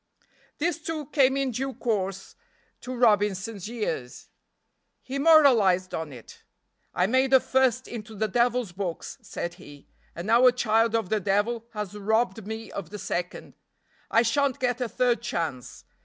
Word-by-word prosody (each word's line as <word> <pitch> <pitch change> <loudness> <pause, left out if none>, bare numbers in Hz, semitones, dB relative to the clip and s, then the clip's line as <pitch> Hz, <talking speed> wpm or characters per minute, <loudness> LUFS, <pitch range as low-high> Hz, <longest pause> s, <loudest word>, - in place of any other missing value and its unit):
This, 335 +1 -1
too, 310 -1 -4
came 270 -2 +3
in 275 -2 0
due 265 +3 -3
course 195 -4 -3 0.4
to 255 0 -6
Robinson's 210 -3 +1
ears. 205 - -5 0.7
He 270 +2 -4
moralized 240 - +5
on 160 -2 -4
it. 120 -4 -13 0.5
"I 180 - +1
made 260 +5 +2
the 265 0 +7
first 260 -1 +1
into 220 -2 -8
the 215 +2 0
devil's 240 -1 +1
books," 180 -2 -5
said 175 - -5
he, 145 -1 -14 0.3
"and 170 - -6
now 235 +4 +5
a - - +7
child 230 -2 +1
of 225 -5 -1
the 215 - +1
devil 205 +4 0
has 210 -2 -5
robbed 220 0 0
me 220 +1 -6
of 185 -5 -6
the 210 - -7
second. 180 -2 -4 0.6
I 230 - +4
shan't 275 +3 +1
get 250 -1 -1
a 245 - -1
third 245 0 +1
chance. 160 - -4
225 Hz, 155 wpm, -26 LUFS, 195-250 Hz, 0.7 s, the